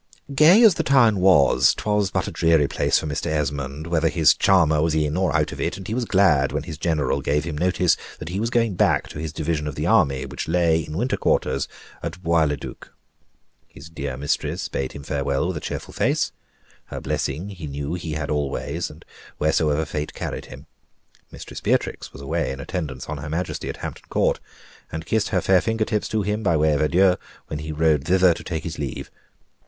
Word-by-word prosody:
Gay 165 Hz, -, +7 dB
as 220 Hz, -4 st, +8 dB
the -, -, -1 dB
town 120 Hz, -7 st, +4 dB
was, 70 Hz, -8 st, +5 dB
'twas 105 Hz, -2 st, 0 dB
but -, -, -1 dB
a -, -, -4 dB
dreary 80 Hz, -3 st, +3 dB
place -, -, +1 dB
for -, -, -2 dB
Mr. 75 Hz, -2 st, -3 dB
Esmond, 75 Hz, -1 st, -2 dB
whether 85 Hz, -1 st, +1 dB
his 80 Hz, -2 st, +5 dB
charmer 80 Hz, -5 st, +3 dB
was 80 Hz, 0 st, +1 dB
in 75 Hz, -1 st, 0 dB
or 95 Hz, 0 st, +1 dB
out -, -, +1 dB
of -, -, -6 dB
it, -, -, -1 dB
and 95 Hz, -, -8 dB
he 110 Hz, -, -3 dB
was 120 Hz, 0 st, -1 dB
glad 75 Hz, -10 st, +3 dB
when -, -, -2 dB
his 75 Hz, -, -8 dB
general 80 Hz, -5 st, 0 dB
gave 75 Hz, +2 st, 0 dB
him 80 Hz, -2 st, -4 dB
notice 90 Hz, +2 st, +2 dB, 0.2 s
that 80 Hz, -, -7 dB
he 95 Hz, +3 st, -3 dB
was 115 Hz, +2 st, 0 dB
going 115 Hz, -3 st, +1 dB
back -, -, +2 dB
to -, -, -8 dB
his 80 Hz, -1 st, -4 dB
division 75 Hz, 0 st, -2 dB
of 75 Hz, -, -4 dB
the 75 Hz, -, -2 dB
army 80 Hz, -11 st, +3 dB
which -, -, -6 dB
lay 85 Hz, -1 st, +3 dB
in 80 Hz, 0 st, -5 dB
winter 125 Hz, +5 st, 0 dB
quarters -, -, 0 dB, 0.3 s
at 95 Hz, -, -5 dB
Bois 85 Hz, -2 st, +3 dB
le 75 Hz, -1 st, -1 dB
Duc. -, -, -10 dB, 0.8 s
His 80 Hz, -, -13 dB
dear 70 Hz, -4 st, -5 dB
mistress 70 Hz, +1 st, -2 dB
bade 65 Hz, -1 st, -3 dB
him 70 Hz, -, -8 dB
farewell 70 Hz, +2 st, -1 dB
with 90 Hz, -, -3 dB
a -, -, -6 dB
cheerful -, -, -6 dB
face; -, -, +1 dB, 0.5 s
her -, -, -6 dB
blessing 80 Hz, +9 st, -3 dB
he 90 Hz, -6 st, -7 dB
knew 70 Hz, +2 st, -4 dB
he 85 Hz, -3 st, -4 dB
had 75 Hz, -1 st, -3 dB
always, 75 Hz, +3 st, -2 dB
and 75 Hz, +3 st, -14 dB, 0.3 s
wheresoever 80 Hz, 0 st, +1 dB
fate 75 Hz, 0 st, -4 dB
carried -, -, -5 dB
him. 65 Hz, +3 st, -12 dB, 0.6 s
Mistress -, -, -9 dB
Beatrix -, -, -1 dB
was 70 Hz, -, -11 dB
away 70 Hz, -, -1 dB
in 65 Hz, -, -6 dB
attendance 70 Hz, -5 st, -4 dB
on 75 Hz, -1 st, -4 dB
her 75 Hz, +2 st, -6 dB
Majesty 85 Hz, +4 st, -3 dB
at -, -, -5 dB
Hampton -, -, -7 dB
Court, -, -, +1 dB, 0.5 s
and 80 Hz, +1 st, -5 dB
kissed 110 Hz, +4 st, 0 dB
her 95 Hz, -3 st, +1 dB
fair 95 Hz, 0 st, +4 dB
fingertips 110 Hz, -2 st, -1 dB
to 110 Hz, -2 st, -1 dB
him, 105 Hz, +2 st, -1 dB
by 85 Hz, -6 st, +2 dB
way 75 Hz, 0 st, +3 dB
of 75 Hz, -, 0 dB
adieu, 90 Hz, +4 st, +4 dB, 0.3 s
when 75 Hz, -, -5 dB
he 80 Hz, +1 st, -5 dB
rode 75 Hz, -2 st, +2 dB
thither 90 Hz, +1 st, +4 dB
to -, -, -9 dB
take 80 Hz, -2 st, -4 dB
his 80 Hz, -2 st, -6 dB
leave. 70 Hz, -4 st, -5 dB
80 Hz, 210 wpm, -23 LUFS, 75-95 Hz, 0.8 s, as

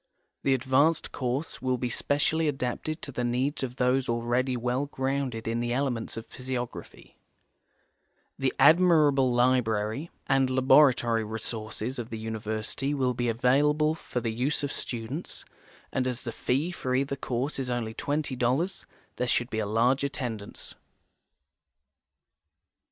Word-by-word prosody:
The 135 Hz, -, +3 dB
advanced 130 Hz, +5 st, +2 dB
course 130 Hz, +4 st, -3 dB
will 130 Hz, -1 st, +1 dB
be 125 Hz, -, -2 dB
specially 150 Hz, +5 st, +1 dB
adai)ted 135 Hz, +4 st, -3 dB
to 140 Hz, -, -5 dB
the 125 Hz, -1 st, -3 dB
needs 125 Hz, +5 st, 0 dB
of 125 Hz, -2 st, -3 dB
those 125 Hz, 0 st, +1 dB
already 120 Hz, +2 st, 0 dB
well 125 Hz, +4 st, -1 dB
grounded 130 Hz, -4 st, -2 dB
in 115 Hz, +1 st, 0 dB
the 120 Hz, 0 st, -1 dB
elements 125 Hz, -4 st, -2 dB
of 115 Hz, -, -6 dB
physiograpln\ 125 Hz, -2 st, -6 dB, 1.3 s
The 135 Hz, -1 st, +1 dB
admirable 150 Hz, -4 st, +5 dB
library 120 Hz, +2 st, +1 dB, 0.2 s
and 135 Hz, -1 st, +3 dB
laboratory 130 Hz, -3 st, +4 dB
resources 110 Hz, +2 st, -4 dB
of 120 Hz, -1 st, -5 dB
the 115 Hz, -, -5 dB
university 110 Hz, +5 st, -3 dB
will 130 Hz, -2 st, +1 dB
be 120 Hz, 0 st, -1 dB
available 145 Hz, +6 st, +3 dB
for 160 Hz, -5 st, -4 dB
the 115 Hz, -1 st, -2 dB
use 135 Hz, +6 st, 0 dB
of 145 Hz, -, -1 dB
students, 125 Hz, +7 st, -5 dB, 0.5 s
and 130 Hz, -1 st, 0 dB
as 125 Hz, -1 st, -3 dB
the 120 Hz, -, -3 dB
fee 135 Hz, +9 st, -1 dB
for 130 Hz, -7 st, -2 dB
either 140 Hz, +1 st, 0 dB
course 135 Hz, +1 st, -2 dB
is 130 Hz, -2 st, -2 dB
only 120 Hz, -2 st, -2 dB
§20, 145 Hz, +5 st, -1 dB, 0.3 s
there 125 Hz, -, 0 dB
should 120 Hz, +1 st, 0 dB
be 110 Hz, -, -1 dB
a 105 Hz, -, -1 dB
large 120 Hz, +6 st, +2 dB
attendance. 120 Hz, -7 st, -5 dB
125 Hz, 140 wpm, -28 LUFS, 120-140 Hz, 1.3 s, admirable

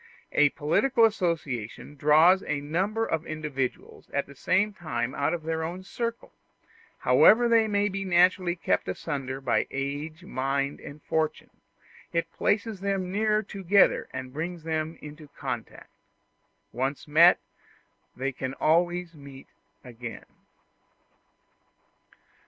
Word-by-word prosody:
A 150 Hz, -1 st, +4 dB
political 230 Hz, -, +2 dB
association 155 Hz, -, -2 dB
draws 155 Hz, +6 st, +5 dB
a 150 Hz, -2 st, -1 dB
number 190 Hz, +10 st, -1 dB
of 160 Hz, -5 st, -2 dB
individuals 150 Hz, -5 st, -4 dB
at 140 Hz, -, -1 dB
the 140 Hz, -, -13 dB
same 195 Hz, +9 st, +1 dB
time 130 Hz, -9 st, -3 dB
out 145 Hz, -, 0 dB
of 170 Hz, -2 st, -3 dB
their 160 Hz, 0 st, -2 dB
own 175 Hz, +3 st, -5 dB
circle: 230 Hz, +4 st, -5 dB, 0.7 s
however 240 Hz, +3 st, +6 dB
they 230 Hz, -1 st, +4 dB
may 205 Hz, -1 st, +1 dB
be 195 Hz, -1 st, -3 dB
naturally 180 Hz, -1 st, +3 dB
kept 95 Hz, -, 0 dB
asunder 135 Hz, -, -4 dB
by 135 Hz, -, 0 dB
age, 145 Hz, +4 st, -4 dB
mind, 140 Hz, -2 st, -2 dB
and 145 Hz, +1 st, -11 dB
fortune, 160 Hz, -1 st, -2 dB, 0.6 s
it 165 Hz, 0 st, -1 dB
places 210 Hz, -1 st, 0 dB
them 195 Hz, -2 st, -2 dB
nearer 215 Hz, +1 st, +1 dB
together 195 Hz, -1 st, +2 dB
and 130 Hz, 0 st, -7 dB
brings 165 Hz, +2 st, -5 dB
them 160 Hz, 0 st, -2 dB
into 150 Hz, +1 st, -10 dB
contact. -, -, -6 dB, 0.8 s
Once 135 Hz, +5 st, -3 dB
met, 165 Hz, +4 st, +7 dB, 0.8 s
they 135 Hz, +2 st, -2 dB
can 130 Hz, 0 st, -5 dB
always 175 Hz, +3 st, +1 dB
meet 140 Hz, -3 st, -13 dB, 0.3 s
again. 115 Hz, -3 st, -8 dB
160 Hz, 125 wpm, -27 LUFS, 140-185 Hz, 0.8 s, met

